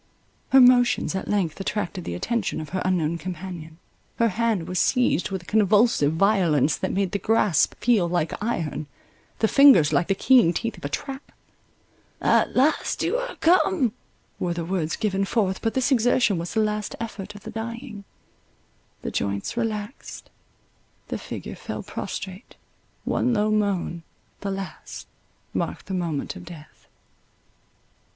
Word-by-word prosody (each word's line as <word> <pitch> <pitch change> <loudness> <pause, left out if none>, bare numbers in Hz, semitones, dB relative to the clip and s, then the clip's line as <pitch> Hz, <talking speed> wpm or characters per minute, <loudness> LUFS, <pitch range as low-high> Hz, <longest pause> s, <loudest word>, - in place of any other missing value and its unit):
Her 270 - +7
motions 245 -4 +5
at 190 - -4
length 195 -5 -1
attracted 195 -2 -3
the 85 - -4
attention 215 - -2
of 155 -2 -7
her 185 +3 -2
unknown 170 -3 0
companion; 170 -2 -7 0.4
her 230 -1 +3
hand 215 -4 0
was 180 -1 -1
seized 250 -8 +2
with 190 -3 -4
a - - -21
convulsive 210 -7 +3
violence 165 -6 +3
that - - -3
made 195 -2 0
the 200 - -1
grasp 210 -8 +2
feel 210 -7 +2
like 170 -2 0
iron, 160 -9 -2 0.5
the 220 - +2
fingers 265 - +6
like 175 - +2
the 195 - +1
keen 235 -5 +5
teeth 230 +6 -3
of - - -15
a 145 - -3
trap.—"At 270 - -4
last 275 +5 +2
you - - +1
are - - -4
come!" 335 - +3 0.5
were 175 -1 -1
the 170 -1 -3
words 170 -3 -1
given 195 -2 0
forth—but 200 +1 0
this 260 +1 +1
exertion 240 -5 +3
was 170 +5 -5
the 220 - +3
last 210 -1 -2
effort 210 -3 -6
of 205 - -12
the - - -7
dying—the 225 -2 -10
joints 100 - -2
relaxed, 220 -1 -5 0.8
the - - -3
figure - - -7
fell - - -6
prostrate, 190 +4 -7 0.5
one 250 -1 +1
low 210 0 +1
moan, 200 -5 0 0.4
the 200 - -4
last, 195 -1 -6 0.5
marked - - -3
the 190 - -5
moment 170 -3 -2
of 185 - -9
death. 165 -3 -13
200 Hz, 145 wpm, -24 LUFS, 175-230 Hz, 0.8 s, Her